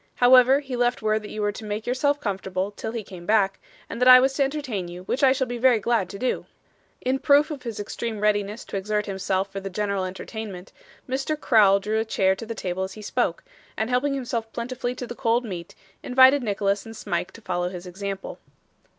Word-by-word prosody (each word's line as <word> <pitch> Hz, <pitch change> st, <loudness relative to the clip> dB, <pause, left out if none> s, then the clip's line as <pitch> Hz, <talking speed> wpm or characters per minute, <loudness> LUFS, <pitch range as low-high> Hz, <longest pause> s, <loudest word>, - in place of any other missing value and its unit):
However, 255 Hz, +2 st, +6 dB
he 265 Hz, -3 st, -5 dB
left 245 Hz, -1 st, 0 dB
word 215 Hz, 0 st, +1 dB
that 210 Hz, -, -9 dB
you 215 Hz, -, -4 dB
were 205 Hz, -, +1 dB
to 210 Hz, -, -9 dB
make 210 Hz, +1 st, -4 dB
yourself 285 Hz, +3 st, +1 dB
comfortable 190 Hz, -2 st, -3 dB
till 220 Hz, +2 st, -6 dB
he 230 Hz, -2 st, -4 dB
came 180 Hz, -3 st, -11 dB
back, 200 Hz, -3 st, +2 dB, 0.3 s
and 235 Hz, -, -7 dB
that 250 Hz, -, +4 dB
I 255 Hz, 0 st, +11 dB
was 265 Hz, +1 st, +2 dB
to 275 Hz, -, +2 dB
entertain 270 Hz, -10 st, -3 dB
you, 175 Hz, +1 st, -9 dB
which 250 Hz, -, -2 dB
I 270 Hz, -2 st, +6 dB
shall 265 Hz, 0 st, +1 dB
be 245 Hz, -1 st, -5 dB
very 250 Hz, -1 st, +5 dB
glad 220 Hz, -3 st, 0 dB
to 200 Hz, -, -7 dB
do.' 255 Hz, +5 st, -2 dB, 0.5 s
In 260 Hz, +1 st, 0 dB
proof 290 Hz, +3 st, +4 dB
of 285 Hz, -4 st, -6 dB
his 230 Hz, -4 st, -6 dB
extreme 220 Hz, +1 st, -4 dB
readiness 210 Hz, +1 st, 0 dB
to -, -, -4 dB
exert 210 Hz, +2 st, -1 dB
himself 195 Hz, 0 st, -2 dB
for 195 Hz, -, -4 dB
the 195 Hz, 0 st, -6 dB
general 200 Hz, 0 st, -1 dB
entertainment, 190 Hz, 0 st, -7 dB, 0.4 s
Mr. 270 Hz, +4 st, -2 dB
Crowl 205 Hz, -7 st, +5 dB
drew 215 Hz, +2 st, -1 dB
a -, -, +1 dB
chair 190 Hz, -3 st, +2 dB
to 225 Hz, +3 st, -8 dB
the 230 Hz, -, -5 dB
table 185 Hz, -2 st, -3 dB
as 190 Hz, 0 st, -3 dB
he 215 Hz, -, -10 dB
spoke, -, -, -1 dB, 0.3 s
and 220 Hz, +3 st, -1 dB
helping 275 Hz, +3 st, +1 dB
himself 235 Hz, -4 st, -3 dB
plentifully 245 Hz, +1 st, -3 dB
to 250 Hz, -, -5 dB
the 240 Hz, -, -7 dB
cold 235 Hz, +1 st, +1 dB
meat, 175 Hz, -5 st, -7 dB, 0.3 s
invited 260 Hz, +2 st, +6 dB
Nicholas 200 Hz, -2 st, 0 dB
and 225 Hz, 0 st, -10 dB
Smike 175 Hz, -4 st, -3 dB
to 230 Hz, -, -13 dB
follow 180 Hz, -3 st, -2 dB
his 180 Hz, -1 st, -8 dB
example. 195 Hz, +2 st, -6 dB
220 Hz, 220 wpm, -24 LUFS, 195-250 Hz, 0.5 s, I